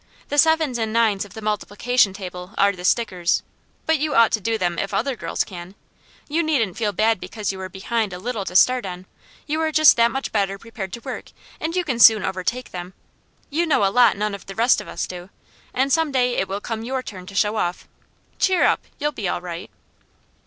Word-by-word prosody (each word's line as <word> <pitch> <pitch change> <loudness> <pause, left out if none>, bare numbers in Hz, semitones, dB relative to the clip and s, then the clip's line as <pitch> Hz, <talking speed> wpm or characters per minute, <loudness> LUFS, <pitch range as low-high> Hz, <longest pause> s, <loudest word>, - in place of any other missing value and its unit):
The 290 - +1
sevens 320 -6 +3
and 220 -1 -1
nines 220 -3 +2
of 205 - -15
the 220 - -8
multiplication 215 +2 +1
table 185 0 -8
are 200 0 +4
the 180 -2 -10
stickers, 185 -3 +1 0.4
but 320 -2 +2
you 300 -1 -1
ought 230 -2 +6
to 215 - 0
do 225 +3 0
them 175 -4 -1
if 195 - -2
other 260 +3 0
girls - - -2
can. 180 0 -10 0.5
You 315 +3 +1
needn't 275 - 0
feel 215 -2 -1
bad 220 0 +2
because 210 0 -4
you 190 0 -8
are 185 - -5
behind 210 +3 -2
a 180 - -6
little 220 +1 -3
to 180 - -6
start 250 +6 +5
on; 180 -1 -7 0.4
you 310 +1 -1
are 315 -1 0
just 310 -1 +6
that 235 0 +5
much 270 +3 -4
better 195 -2 0
prepared 210 -3 -7
to 235 - -6
work, - - -7 0.3
and 330 +2 -3
you 365 - +1
can 260 -8 -2
soon 220 -3 +7
overtake 215 +7 -3
them. 180 +1 -7 0.6
You 335 +4 +1
know 280 -10 +3
a 195 - +1
lot 240 -6 +5
none 210 0 -1
of 200 - -9
the 195 - -8
rest 235 +3 +3
of - - -12
us - - -3
do, 180 0 -9 0.4
and 265 +2 +1
some 320 -2 +2
day 250 -2 +1
it 190 - 0
will 195 +2 -4
come 225 0 -4
your 260 +2 -3
turn 185 -5 -9
to 200 - -10
show 210 +2 +2
off. 175 -3 -2 0.5
Cheer 375 -2 +3
up, - - +3 0.2
you'll 295 +1 -1
be 210 -9 -4
all 175 - -1
right." 175 -1 -7
220 Hz, 225 wpm, -22 LUFS, 190-255 Hz, 0.6 s, soon